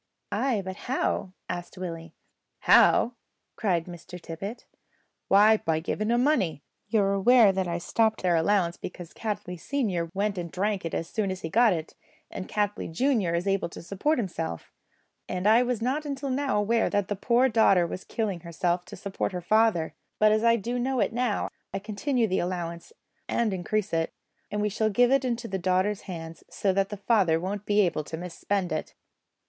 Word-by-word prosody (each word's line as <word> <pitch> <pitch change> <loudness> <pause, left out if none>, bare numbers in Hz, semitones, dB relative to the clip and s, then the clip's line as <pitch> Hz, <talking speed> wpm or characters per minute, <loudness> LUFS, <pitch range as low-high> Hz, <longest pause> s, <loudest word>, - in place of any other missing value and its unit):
"Ay, 220 0 0
but 190 0 -5
how?" 250 -7 0 0.2
asked 175 +1 -6
Willie. 165 -3 -6 0.5
"How?" 240 - +5 0.4
cried 175 -7 0
Mr 175 0 -10
Tippet; 185 +8 -7 0.6
"why, 210 +3 +6
by 160 -5 0
giving 210 +6 -2
'em 240 +1 +3
money. 180 - +1 0.2
You 220 -2 +2
are 195 0 +1
aware 215 +2 +6
that 190 -1 -1
I 170 0 -1
stopped 220 +5 0
their 180 -2 +3
allowance 170 0 +2
because 175 -2 -8
Cattley 205 -5 -4
senior 190 - -1
went 200 -1 0
and 170 -2 -5
drank 200 0 -1
it 165 - -3
as 165 - -2
soon 210 +1 -1
as 185 0 -4
he 160 - -4
got 230 +5 +5
it, 165 -3 -3 0.4
and 185 - -6
Cattley 205 -4 -1
junior 210 - +1
is 170 +2 -1
able 195 -3 0
to - - -10
support 200 - 0
himself, 165 - -4 0.6
and 185 +1 -3
I 220 +3 +6
was 245 -2 -1
not 270 +5 0
until 280 -2 -3
now 270 -4 0
aware 225 +3 +2
that 205 -2 0
the 205 - -2
poor 240 +6 +3
daughter 215 -7 +4
was 180 +2 -6
killing 205 -6 -2
herself 175 +1 -1
to - - -9
support 195 0 -3
her 180 - -2
father; 215 -4 +2 0.2
but 215 0 +5
as 215 +1 +2
I 230 0 +5
do 235 +3 -2
know 260 +1 0
it 205 +1 +1
now 240 -3 0 0.3
I'll - - -1
continue 225 +5 0
the 190 - 0
allowance 175 - -4 0.4
and 225 -4 +1
increase 195 +2 -2
it, 165 0 0 0.4
and 210 0 -2
we 210 - +1
shall 215 +2 0
give 245 +4 +3
it 275 -1 +3
into 235 -2 -2
the 190 -2 -3
daughter's 185 +3 +1
hands, 165 -3 -7
so 195 -2 0
that 195 0 +1
the 205 - -5
father 195 -6 +2
won't 200 +3 -4
be 210 0 +4
able 175 -5 0
to 160 - -6
mis 175 0 -7
spend 195 0 -1
it." 155 - -4
200 Hz, 195 wpm, -27 LUFS, 175-225 Hz, 0.6 s, why